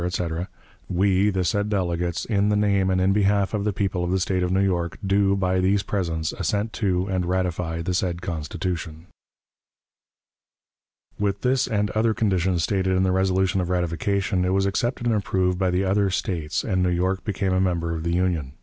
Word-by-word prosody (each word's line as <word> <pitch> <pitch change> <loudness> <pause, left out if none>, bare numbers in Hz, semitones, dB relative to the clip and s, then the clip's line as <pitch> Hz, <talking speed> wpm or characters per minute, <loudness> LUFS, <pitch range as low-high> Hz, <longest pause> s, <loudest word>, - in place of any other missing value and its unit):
etc., 90 -1 -2 0.4
"we, 95 +2 +2
the 95 -2 0
said 105 +3 0
delegates, 90 -3 -1
in 105 -2 +1
the 105 - +2
name 100 -2 +2
and 95 0 +1
in 95 +1 +3
behalf 100 0 +2
of 105 -2 -1
the 105 - +2
people 95 -2 -1
of 85 - -2
the 95 +1 +1
State 95 0 0
of 90 0 0
New 95 - +2
York, 85 -3 -1
do, 100 0 +3
by 95 -1 +1
these 95 +2 +2
presents, 85 -6 -2
assent 105 +2 -2
to 95 -4 0
and 95 -2 -1
ratify 90 -2 -1
the 90 - -2
said 90 -1 -1
Constitution." 85 -1 -4 2.1
With 100 -1 -1
this 130 +1 +2
and 105 -3 0
other 110 0 +1
conditions 95 -5 +1
stated 95 -1 +1
in 95 - +2
the 95 - +2
resolution 95 0 +1
of 90 - -3
ratification, 90 +2 0
it 90 +1 +1
was 95 0 +2
accepted 120 +5 -1
and 120 - +2
approved 95 -3 0
by 95 -1 +2
the 90 +2 +1
other 100 +1 +2
States, 85 -4 -2
and 95 -4 0
New 90 - +2
York 95 +2 0
became 95 -2 -1
a 95 - +2
member 85 -3 0
of 80 - -4
the 85 +1 -1
Union. 85 -7 -1
95 Hz, 195 wpm, -24 LUFS, 90-100 Hz, 2.1 s, in